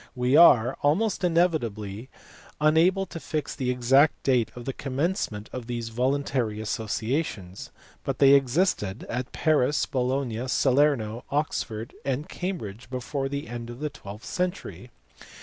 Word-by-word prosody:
We 125 Hz, +2 st, +2 dB
are, 125 Hz, -8 st, +7 dB
almost 195 Hz, +9 st, +1 dB
inevitably, 125 Hz, -, 0 dB, 0.5 s
unable 165 Hz, +6 st, +3 dB
to 165 Hz, -, -8 dB
fix 155 Hz, -2 st, -3 dB
the 130 Hz, -2 st, -2 dB
exact 130 Hz, +4 st, +3 dB
date 125 Hz, -4 st, +2 dB
of 120 Hz, -1 st, -8 dB
the 135 Hz, -, -3 dB
commencement 135 Hz, -, -2 dB
of 125 Hz, -2 st, -6 dB
these 120 Hz, -2 st, -4 dB
voluntary 125 Hz, -2 st, -1 dB
associations, 110 Hz, -, -3 dB, 0.3 s
but -, -, -2 dB
they 140 Hz, -1 st, +6 dB
existed 135 Hz, -, +1 dB
at 125 Hz, +1 st, -3 dB
Paris, 150 Hz, -3 st, +2 dB
Bologna, 130 Hz, -2 st, -1 dB
Salerno, 130 Hz, -4 st, +2 dB
Oxford, 120 Hz, -6 st, -2 dB
and 135 Hz, +2 st, -2 dB
Cambridge 125 Hz, -, -5 dB
before 135 Hz, +2 st, -3 dB
the 140 Hz, -1 st, -4 dB
end 120 Hz, 0 st, -6 dB
of 120 Hz, +1 st, -8 dB
the 150 Hz, 0 st, -3 dB
twelfth 105 Hz, -5 st, -10 dB
century. 180 Hz, +1 st, -4 dB
130 Hz, 130 wpm, -26 LUFS, 115-150 Hz, 0.5 s, are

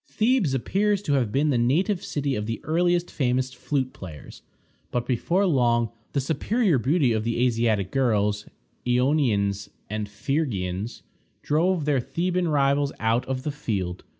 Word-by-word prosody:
Thebes 220 Hz, -, +2 dB
appears 200 Hz, -, +1 dB
to 145 Hz, -, 0 dB
have 125 Hz, -6 st, +1 dB
been 145 Hz, +4 st, +2 dB
the 125 Hz, -, +2 dB
native 175 Hz, -, +1 dB
city 140 Hz, -2 st, -2 dB
of 105 Hz, -2 st, -3 dB
the 115 Hz, -1 st, -3 dB
earliest 175 Hz, +2 st, +1 dB
famous 130 Hz, -1 st, 0 dB
flute 130 Hz, +1 st, -2 dB
players, 80 Hz, -6 st, -10 dB, 0.5 s
but 120 Hz, -1 st, -2 dB
before 170 Hz, -, +1 dB
long 120 Hz, -, +2 dB, 0.2 s
the 140 Hz, -, +1 dB
superior 160 Hz, -, +1 dB
beauty 135 Hz, 0 st, +2 dB
of 110 Hz, -1 st, -1 dB
the 115 Hz, +2 st, +1 dB
Asiatic 115 Hz, -5 st, +1 dB
girls 105 Hz, -5 st, +1 dB, 0.4 s
Ionians 120 Hz, -7 st, +1 dB, 0.2 s
and 105 Hz, -1 st, -3 dB
Phrygians 105 Hz, -, -2 dB, 0.4 s
drove 165 Hz, +2 st, +1 dB
their 145 Hz, -3 st, +2 dB
Theban 175 Hz, +7 st, -1 dB
rivals 140 Hz, -1 st, +2 dB
out 115 Hz, +3 st, +1 dB
of 130 Hz, -1 st, -3 dB
the 150 Hz, -, -2 dB
field. 95 Hz, -10 st, -3 dB
130 Hz, 150 wpm, -25 LUFS, 115-155 Hz, 0.5 s, Thebes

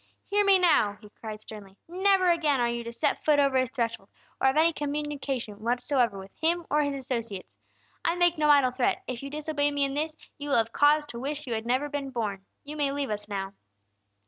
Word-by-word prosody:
"Hear 410 Hz, 0 st, +4 dB
me, 395 Hz, -1 st, +6 dB
now!" 300 Hz, -, +3 dB
he 210 Hz, -, -15 dB
cried, 215 Hz, -1 st, -8 dB
sternly. 205 Hz, -3 st, -11 dB
"Never 375 Hz, +2 st, +3 dB
again 315 Hz, -6 st, +2 dB
are 240 Hz, -, +2 dB
you 235 Hz, 0 st, -3 dB
to 235 Hz, -, -5 dB
set 235 Hz, -, -1 dB
foot 300 Hz, -1 st, +4 dB
over 275 Hz, -2 st, +3 dB
his 255 Hz, -1 st, 0 dB
threshold, 230 Hz, -6 st, -3 dB, 0.3 s
or -, -, +4 dB
have 265 Hz, +3 st, +2 dB
any 330 Hz, +2 st, +4 dB
communication 285 Hz, -7 st, -3 dB
whatsoever 245 Hz, -1 st, +1 dB
with 190 Hz, 0 st, -10 dB
him 340 Hz, +1 st, +1 dB
or 300 Hz, +1 st, +3 dB
his 285 Hz, -1 st, -1 dB
associates. 235 Hz, -7 st, -4 dB, 0.5 s
I 335 Hz, -, +1 dB
make 350 Hz, -1 st, +3 dB
no 305 Hz, -2 st, +1 dB
idle 280 Hz, -3 st, +5 dB
threat; 250 Hz, -1 st, 0 dB
if 250 Hz, -2 st, -5 dB
you 275 Hz, -, -6 dB
disobey 295 Hz, 0 st, -1 dB
me 285 Hz, -1 st, 0 dB
in 275 Hz, 0 st, -1 dB
this, 310 Hz, +2 st, -2 dB, 0.2 s
you 290 Hz, 0 st, -5 dB
will 280 Hz, -, +3 dB
have 225 Hz, 0 st, +1 dB
cause 295 Hz, +1 st, +4 dB
to 235 Hz, -, -6 dB
wish 295 Hz, +3 st, -4 dB
you 245 Hz, -, -3 dB
had 220 Hz, +1 st, -3 dB
never 260 Hz, +4 st, +1 dB
been 290 Hz, -2 st, -4 dB
born. 210 Hz, -6 st, -3 dB, 0.2 s
You 295 Hz, +1 st, -8 dB
may 285 Hz, -2 st, +1 dB
leave 280 Hz, -3 st, -2 dB
us 210 Hz, 0 st, -4 dB
now!" 195 Hz, -1 st, -4 dB
275 Hz, 225 wpm, -27 LUFS, 230-300 Hz, 0.5 s, me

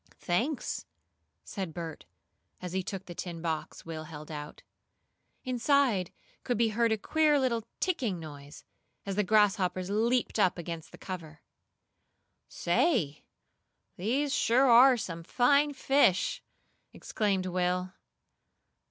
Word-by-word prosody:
"Thanks," 240 Hz, -, -2 dB, 0.6 s
said 190 Hz, -6 st, -6 dB
Bert, 165 Hz, -, -6 dB, 0.5 s
as 180 Hz, -1 st, -6 dB
he 190 Hz, -, 0 dB
took 190 Hz, +1 st, -6 dB
the 175 Hz, -, -8 dB
tin 170 Hz, -1 st, -6 dB
box 160 Hz, -2 st, -4 dB
Will 160 Hz, -1 st, -6 dB
held 155 Hz, -1 st, -9 dB
out. 150 Hz, -1 st, -8 dB, 0.8 s
Inside 255 Hz, -, +2 dB, 0.3 s
could 245 Hz, -, -1 dB
be 230 Hz, 0 st, +3 dB
heard 230 Hz, +1 st, +1 dB
a 220 Hz, -, +2 dB
queer 305 Hz, +6 st, +2 dB
little 235 Hz, -4 st, 0 dB
"ticking" 250 Hz, -, -1 dB
noise, 145 Hz, -2 st, -11 dB, 0.4 s
as 195 Hz, -1 st, -3 dB
the 210 Hz, -, +2 dB
grasshoppers 195 Hz, -2 st, +2 dB
leaped 230 Hz, +2 st, +1 dB
up 185 Hz, -3 st, +3 dB
against 165 Hz, -2 st, -6 dB
the -, -, -12 dB
cover. 165 Hz, -5 st, -8 dB, 1.0 s
"Say, 175 Hz, -, 0 dB, 0.7 s
these 265 Hz, +10 st, 0 dB
are -, -, 0 dB
sure 250 Hz, +1 st, +6 dB
some 170 Hz, -6 st, -5 dB
fine 280 Hz, -, +3 dB
fish!" 270 Hz, -8 st, +2 dB, 0.5 s
exclaimed 195 Hz, -3 st, -1 dB
Will. 180 Hz, 0 st, -1 dB
195 Hz, 120 wpm, -30 LUFS, 170-245 Hz, 1.0 s, sure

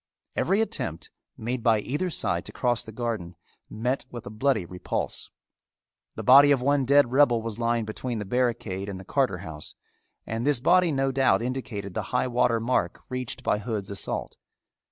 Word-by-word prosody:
Every 200 Hz, +3 st, +2 dB
attempt, 85 Hz, -, -3 dB, 0.3 s
made 120 Hz, +2 st, -3 dB
by 110 Hz, -1 st, +4 dB
either 145 Hz, -, -2 dB
side 90 Hz, -, -1 dB
to -, -, -7 dB
cross 120 Hz, -2 st, 0 dB
the 110 Hz, -, -10 dB
garden, 110 Hz, -7 st, -4 dB, 0.3 s
met 125 Hz, +5 st, -2 dB
with 120 Hz, -3 st, -8 dB
a -, -, -7 dB
bloody 110 Hz, -3 st, +1 dB
repulse. 90 Hz, +1 st, -4 dB, 0.9 s
The -, -, -5 dB
body 140 Hz, +3 st, +8 dB
of 140 Hz, -2 st, +4 dB
one 140 Hz, +1 st, +2 dB
dead 140 Hz, -1 st, +5 dB
rebel 125 Hz, -4 st, +4 dB
was 115 Hz, -1 st, -4 dB
lying 115 Hz, -1 st, +1 dB
between 115 Hz, +2 st, -4 dB
the 105 Hz, -, -4 dB
barricade 105 Hz, -4 st, -1 dB
and 95 Hz, -2 st, -6 dB
the 95 Hz, -, -11 dB
Carter 130 Hz, -5 st, +1 dB
house 75 Hz, -2 st, -6 dB, 0.5 s
and 115 Hz, +1 st, -3 dB
this 145 Hz, -2 st, +3 dB
body 180 Hz, +6 st, +4 dB
no 135 Hz, -1 st, +1 dB
doubt 135 Hz, -3 st, +3 dB
indicated 120 Hz, -6 st, -4 dB
the -, -, -1 dB
high 125 Hz, -, +1 dB
water 120 Hz, -2 st, +2 dB
mark 120 Hz, +3 st, 0 dB
reached 125 Hz, 0 st, -4 dB
by 105 Hz, -, +1 dB
Hood's 105 Hz, -2 st, -4 dB
assault. 100 Hz, -, -4 dB
120 Hz, 175 wpm, -26 LUFS, 105-130 Hz, 0.9 s, body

